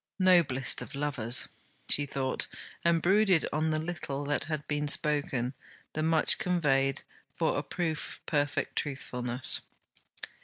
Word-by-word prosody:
Noblest 170 -9 +3
of - - -8
lovers! 140 -5 +2 0.4
she 145 0 +2
thought, 135 -1 -1 0.4
and 170 -1 +2
brooded 190 -2 +4
on 155 +1 +1
the 155 - +1
little 155 -4 -4
that 145 0 0
had 155 -1 -4
been 145 0 -1
spoken, 145 -4 +2 0.4
the 155 - -2
much 160 0 +3
conveyed, 135 -7 +1 0.3
for - - 0
a - - 0
proof 160 -4 -3
of - - -21
perfect 145 -1 -1
truthfulness. 125 -3 -1
145 Hz, 130 wpm, -29 LUFS, 135-165 Hz, 0.4 s, brooded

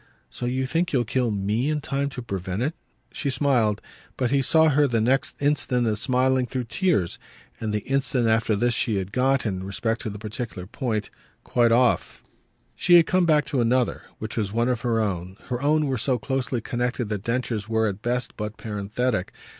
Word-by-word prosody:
"So 120 - -4
you 130 +1 0
think 165 +6 0
you'll 125 -4 +2
kill 125 +2 0
ME 105 +6 0
in 155 -1 0
time 140 0 -2
to 125 -3 -7
prevent 95 0 -3
it?" 150 +5 -1 0.4
She 140 - -2
smiled, 125 -6 +2 0.4
but 125 -2 0
he 140 -1 +3
saw 160 +4 +4
her 145 0 +4
the 120 -3 +1
next 130 +5 +1
instant 140 -4 +1
as 105 -2 0
smiling 130 -1 +2
through 130 0 -3
tears; 120 - 0 0.4
and 110 -1 -2
the 105 0 -1
instant 135 -3 +1
after 110 -1 +2
this 120 +4 +1
she 110 -1 0
had 95 0 -3
got, 130 +3 +2
in 95 -3 -2
respect 110 +4 -2
to 115 - -4
the 105 - -7
particular 105 -2 -5
point, 110 0 -3 0.3
quite 120 -1 +2
off. 120 +1 +2 0.5
She 175 - +4
had 170 -2 +8
come 185 0 +2
back 150 -2 +4
to 135 -4 0
another, 120 +1 +1 0.2
which 110 +2 -6
was 105 -3 -1
one 115 +3 +1
of 125 -2 0
her 115 -2 +1
own; 95 -3 -2
her 125 0 -2
own 150 +1 +3
were 135 -4 -1
so 125 +2 +1
closely 130 0 -2
connected 125 +2 -2
that 105 -3 -2
Densher's 115 -3 -2
were 110 0 +2
at 100 0 -4
best 120 +1 -2
but 105 0 -5
parenthetic. 105 0 -2
120 Hz, 200 wpm, -25 LUFS, 110-135 Hz, 0.5 s, had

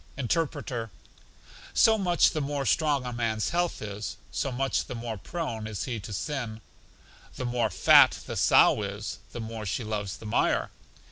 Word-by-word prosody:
Interpreter: 135 -4 -2 0.9
So 225 - +6
much 180 -5 +3
the 155 - -2
more 140 -1 -2
strong 145 -5 +2
a 125 - -4
man's 115 -2 -1
health 175 -7 -1
is, 105 0 -5
so 135 - -2
much 135 +2 0
the - - -6
more 115 -1 -4
prone 110 - -4
is 105 -4 -4
he 120 -4 -3
to 105 - -8
sin. 115 - -4 0.7
The 130 - -4
more 120 -2 0
fat 90 - +6
the - - -5
sow - - +5
is, 100 +1 -5
the - - -6
more 110 -1 -5
she 115 - -2
loves 105 -3 -3
the - - -13
mire. 60 - +1
120 Hz, 165 wpm, -28 LUFS, 110-140 Hz, 0.9 s, So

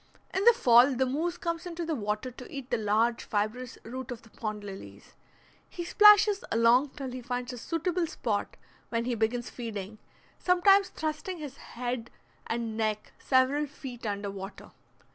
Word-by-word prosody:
In 380 - 0
the 475 - +9
fall 250 - +6
the 260 +2 +2
moose 325 +7 -1
comes 335 +1 -3
into 340 -1 -4
the 325 - -1
water 215 0 -2
to 250 +1 -11
eat 275 -2 -7
the - - +2
large 220 +3 +1
fibrous 220 +4 -2
roots 255 +2 -6
of 240 - -7
the 225 - -18
pond 215 -2 -5
lilies. 195 -1 -10 0.6
He 345 - -5
splashes 420 +1 +6
along 235 +5 +4
till 270 -3 -5
he 255 0 -6
finds 245 +1 -4
a - - -7
suitable 340 +5 -1
spot, 215 -8 -3 0.3
when 230 0 -1
he 250 - 0
begins 230 +2 -1
feeding, 215 -3 -6 0.4
sometimes 380 +2 +4
thrusting 315 +4 -4
his 290 -4 -8 0.2
bead 240 -1 -3 0.4
and 230 -1 -2
neck 215 -1 -2
several 275 +3 +2
feet 265 -4 -9
under 200 -1 -3
water. 195 0 -9
250 Hz, 165 wpm, -29 LUFS, 225-310 Hz, 0.6 s, the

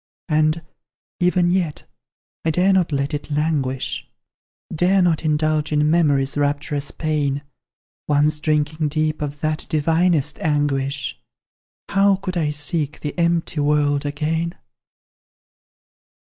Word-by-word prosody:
And, 155 +1 +2 0.6
even 180 0 +3
yet, 175 -5 -1 0.6
I 160 - +1
dare 180 +4 +3
not 180 -4 +2
let 140 +1 -1
it 145 0 -4
languish, 145 -3 -1 0.6
Dare 180 +4 +3
not 175 -4 +2
indulge 155 0 +1
in 150 0 +2
memory's 145 -5 +2
rapturous 145 0 -1
pain; 145 -3 -1 0.6
Once 150 +1 +2
drinking 155 0 0
deep 155 +1 -1
of 145 0 -4
that 155 0 -2
divinest 160 0 +1
anguish, 145 -2 -1 0.7
How 195 0 +4
could 185 -1 -5
I 160 -4 +1
seek 150 0 -1
the 150 - -4
empty 170 -2 0
world 145 -1 +2
again? 160 +4 -2
155 Hz, 115 wpm, -21 LUFS, 145-165 Hz, 0.7 s, How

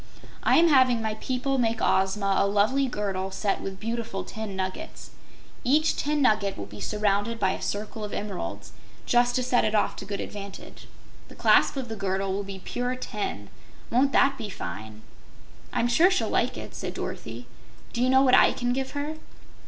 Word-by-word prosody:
"I - - +4
am 335 +1 +6
having 260 -4 +5
my 220 -1 -1
people 255 +4 -1
make 230 -1 +1
Ozma 195 +1 +2
a 200 - +3
lovely 215 +7 +2
girdle 195 -5 -2
set 195 +1 -1
with 195 -1 -6
beautiful 230 -2 -3
tin 220 -3 -6
nuggets. 190 +12 -5 0.5
Each 300 +5 +3
tin 295 0 0
nugget 215 -5 +2
will 100 - -5
be 105 +1 -11
surrounded 210 - 0
by 190 -3 +2
a - - -5
circle 210 +1 -4
of 210 - -5
emeralds, 205 -3 -5 0.3
just 245 0 +3
to 255 - +1
set 245 -1 +2
it 215 0 +1
off 210 - +2
to - - -6
good 200 0 -4
advantage. 200 -1 -8 0.4
The - - -14
clasp - - +4
of 260 -2 -3
the 225 - -5
girdle 195 -1 -1
will 200 +1 -2
be 195 -1 -7
pure 245 +6 -3
tin! 210 - -5 0.4
Won't 265 +4 +3
that 275 -1 +4
be 215 -3 -4
fine?" 110 - -7 0.7
"I'm 235 - +1
sure 325 +10 +5
she'll 380 - 0
like - - +1
it," - - -8
said - - -5
Dorothy. - - -6 0.5
"Do 235 - -1
you 255 - +3
know 265 +1 +5
what 255 -2 +4
I - - +7
can 245 0 -1
give 265 +1 -3
her?" 295 +2 -3
220 Hz, 190 wpm, -26 LUFS, 195-255 Hz, 0.7 s, I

